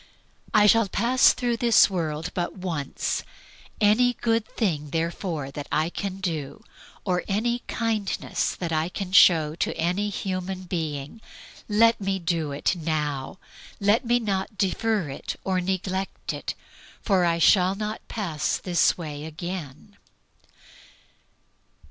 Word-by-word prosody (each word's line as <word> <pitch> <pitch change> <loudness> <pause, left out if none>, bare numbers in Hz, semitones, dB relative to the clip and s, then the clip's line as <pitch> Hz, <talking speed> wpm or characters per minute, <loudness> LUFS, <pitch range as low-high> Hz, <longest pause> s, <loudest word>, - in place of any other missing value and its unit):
"I 210 -1 +5
shall 225 +1 +5
pass 240 +6 +4
through 240 -2 -1
this 235 -1 +6
world 165 -3 -3
but 175 +1 -3
once. 165 -7 -2 0.6
Any 230 +4 +4
good 225 -1 0
thing, 155 -10 -2
therefore, 165 -2 -2
that 145 0 -7
I 155 +3 +1
can 195 0 -4
do, 155 -7 -4 0.4
or 180 -2 0
any 235 +4 0
kindness 220 -4 -1
that 170 -2 -4
I 160 +1 0
can 185 0 -5
show 160 -6 +6
to 165 - -2
any 180 +5 0
human 185 -1 -4
being, 160 0 -4 0.5
let 230 +1 +4
me 195 0 0
do 165 -4 -1
it 140 +6 0
now. 150 -3 -2 0.4
Let 205 +3 +3
me 240 0 +2
not 200 -2 -2
defer 205 -1 0
it 135 - -6
or 185 -1 0
neglect 190 +1 -3
it, - - -5 0.5
for 190 -4 +3
I 170 -1 +2
shall 185 +2 +4
not 215 +1 -4
pass 165 -9 -2
this 175 -2 +2
way 150 -3 -6
again." 160 +2 -7
185 Hz, 130 wpm, -25 LUFS, 160-210 Hz, 0.6 s, this